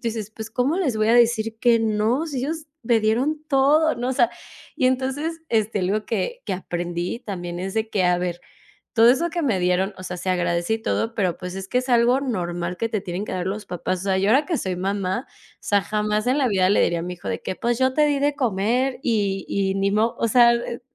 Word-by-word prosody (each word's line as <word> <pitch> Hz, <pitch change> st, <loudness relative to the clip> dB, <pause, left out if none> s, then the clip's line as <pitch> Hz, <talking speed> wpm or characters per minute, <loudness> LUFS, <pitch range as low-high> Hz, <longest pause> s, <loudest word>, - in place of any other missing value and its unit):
dices: 220 Hz, -2 st, -5 dB
"Pues, 220 Hz, 0 st, -8 dB
¿cómo 255 Hz, +8 st, 0 dB
les 270 Hz, -, 0 dB
voy 215 Hz, 0 st, +1 dB
a 235 Hz, -, +5 dB
decir 225 Hz, -2 st, +3 dB
que 235 Hz, -2 st, +4 dB
no? 225 Hz, +7 st, +1 dB
Sí, 280 Hz, -5 st, -4 dB
ellos 310 Hz, +3 st, -4 dB, 0.2 s
me 230 Hz, 0 st, +3 dB
dieron 250 Hz, +8 st, 0 dB
todo, 295 Hz, +3 st, +4 dB
¿no?" 245 Hz, +2 st, -3 dB
O -, -, 0 dB
sea, 240 Hz, -2 st, +3 dB, 0.4 s
y 255 Hz, -, +1 dB
entonces, 270 Hz, +6 st, -1 dB
este, 220 Hz, -2 st, +1 dB
algo 200 Hz, +4 st, 0 dB
que 355 Hz, -, -2 dB
que -, -, -3 dB
aprendí 175 Hz, +4 st, -4 dB
también 175 Hz, -5 st, -5 dB
es 190 Hz, +2 st, -4 dB
de, 220 Hz, 0 st, -1 dB
que 200 Hz, -4 st, 0 dB
a 180 Hz, 0 st, +3 dB
ver, 175 Hz, -1 st, -3 dB, 0.5 s
todo 230 Hz, 0 st, +6 dB
eso 335 Hz, +7 st, +2 dB
que 345 Hz, 0 st, -2 dB
me 225 Hz, -11 st, +1 dB
dieron. 180 Hz, +3 st, +1 dB
O 185 Hz, -, -9 dB
sea, 180 Hz, -, -5 dB
se 185 Hz, -, -4 dB
agradece 175 Hz, +2 st, 0 dB
y -, -, +1 dB
todo, 225 Hz, +1 st, -2 dB
pero 185 Hz, -5 st, 0 dB
pues 180 Hz, 0 st, -7 dB
es 195 Hz, 0 st, -6 dB
que 250 Hz, -, +1 dB
es 255 Hz, -, -6 dB
algo 240 Hz, +2 st, +4 dB
normal 175 Hz, -8 st, -3 dB
que 230 Hz, -, -1 dB
te 215 Hz, -, -1 dB
tienen 185 Hz, 0 st, -4 dB
que -, -, -6 dB
dar 185 Hz, 0 st, -2 dB
los 205 Hz, +1 st, -4 dB
papás. 180 Hz, 0 st, -3 dB
O -, -, -6 dB
sea, 190 Hz, -1 st, +1 dB
yo 195 Hz, +2 st, +1 dB
ahora 275 Hz, +6 st, +4 dB
que 335 Hz, -5 st, -1 dB
soy 185 Hz, -1 st, -2 dB
mamá, 195 Hz, +4 st, -2 dB
o -, -, -25 dB
sea, 205 Hz, -1 st, +2 dB
jamás 210 Hz, +2 st, -1 dB
en 260 Hz, +3 st, +2 dB
la 265 Hz, -3 st, +2 dB
vida 190 Hz, -2 st, +2 dB
le 205 Hz, -, +4 dB
diría 170 Hz, -1 st, +1 dB
a -, -, -3 dB
mi 180 Hz, +1 st, -4 dB
hijo 100 Hz, -, -7 dB
de 95 Hz, -, -3 dB
que: 185 Hz, -, -4 dB
"Pues, 240 Hz, +1 st, -1 dB
yo 260 Hz, 0 st, +2 dB
te 300 Hz, +1 st, +3 dB
di 290 Hz, -1 st, +1 dB
de 290 Hz, 0 st, +1 dB
comer 245 Hz, +2 st, 0 dB
y 200 Hz, -5 st, 0 dB
y 195 Hz, -1 st, 0 dB
ni 195 Hz, 0 st, +1 dB
mo" 220 Hz, +3 st, +1 dB
O 230 Hz, -, +1 dB
sea, 235 Hz, +1 st, +6 dB
e 235 Hz, +1 st, -4 dB
220 Hz, 250 wpm, -23 LUFS, 190-255 Hz, 0.5 s, todo